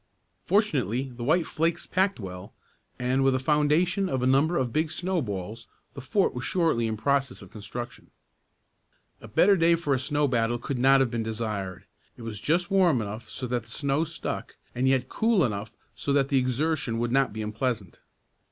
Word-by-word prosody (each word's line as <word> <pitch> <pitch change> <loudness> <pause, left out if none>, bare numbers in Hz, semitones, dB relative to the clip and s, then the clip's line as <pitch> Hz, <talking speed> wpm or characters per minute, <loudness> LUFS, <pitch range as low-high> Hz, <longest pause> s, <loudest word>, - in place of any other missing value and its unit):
Fortunately 135 - +1
the 120 - -6
white 160 +6 +2
flakes 165 +2 -1
packed 190 -2 +1
well, 90 -1 -8 0.4
and 130 +2 +1
with 135 -1 +3
a - - +1
foundation 155 +7 +2
of 130 -2 -1
a - - +2
number 140 +6 +3
of 125 -3 -1
big 155 +1 +1
snowballs 115 - -3 0.3
the 140 - -8
fort 190 +10 +1
was 125 - -5
shortly 160 -6 +1
in 110 -1 -2
process 140 +2 0
of - - -15
construction. 120 +2 -8 1.1
A - - -10
better 200 +1 +4
day 170 -1 +4
for 160 -4 -1
a 130 - +1
snow 145 +3 0
battle 120 -2 +1
could 125 +2 -4
not 135 +1 +5
have 130 -3 +1
been 120 -1 -1
desired. 110 -4 -4 0.3
It 120 - -10
was 110 -3 -6
just 170 - 0
warm 180 -9 +4
enough 110 +1 -6
so 130 - -5
that 120 -2 -2
the - - -18
snow 140 +5 0
stuck, 165 +1 -5 0.2
and 125 +2 0
yet 130 -1 +2
cool 220 - +2
enough 105 -1 -4 0.2
so 140 - -3
that 140 -1 +2
the 135 - +3
exertion 130 -1 0
would 120 0 -1
not 135 +1 +2
be 110 +1 -5
unpleasant. 110 -2 -3
130 Hz, 190 wpm, -27 LUFS, 115-155 Hz, 1.1 s, not